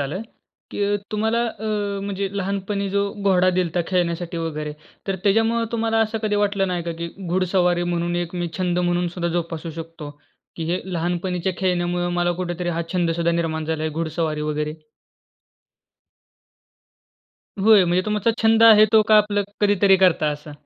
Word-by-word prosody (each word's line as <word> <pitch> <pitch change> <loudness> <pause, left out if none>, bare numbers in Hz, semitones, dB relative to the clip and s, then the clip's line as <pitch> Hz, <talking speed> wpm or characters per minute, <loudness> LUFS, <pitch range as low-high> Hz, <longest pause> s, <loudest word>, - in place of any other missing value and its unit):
आलं 145 +9 -3 0.5
की 205 0 0 0.2
तुम्हाला 220 +2 +1
अ, 220 -2 -7 0.4
म्हणजे 200 0 -3
लहानपणी 200 +1 -2
जो 200 +1 +1 0.2
घोडा 185 -2 +4
दिलता 175 -1 0
खेळण्यासाठी 175 -2 -1
वगैरे, 155 -2 -4 0.3
तर 195 -1 -1
त्याच्यामुळं 225 +3 +2
तुम्हाला 225 -1 0
असं 225 0 0
कधी 210 -1 0
वाटलं 200 -1 +1
नाही 180 -1 -2
का, 170 0 -4
की 170 +1 -5 0.2
घुडसवारी 180 -1 +1
म्हणून 175 0 -1
एक 175 0 -3
मी 175 -1 -2
छंद 180 -1 0
म्हणून 175 0 +1
सुद्धा 170 0 -3
जोपासू 165 -1 -3
शकतो 165 -2 -8 0.5
की 165 - -4
हे 180 - 0
लहानपणीच्या 175 +2 -1
खेळण्यामुळं 175 -1 0
मला 175 0 +1
कुठेतरी 175 0 -3
हा 170 0 -1
छंद 175 -2 +1
सुद्धा 170 +1 0
निर्माण 160 -2 -1
झाला 160 0 -2
आहे, 160 - -1
घुडसवारी 160 -1 -2
वगैरे? 150 0 -2 2.9
होय, 210 -2 +6
म्हणजे 175 +1 +1
तुमचा 210 +1 +1
छंद 225 0 +4
आहे 215 -2 +8
तो, 220 -1 +7
का 215 - +7
आपलं 205 -1 +1 0.2
कधीतरी 200 -2 +4
करता 180 -4 +3
असा? 150 +1 -9
180 Hz, 155 wpm, -22 LUFS, 170-200 Hz, 2.9 s, आहे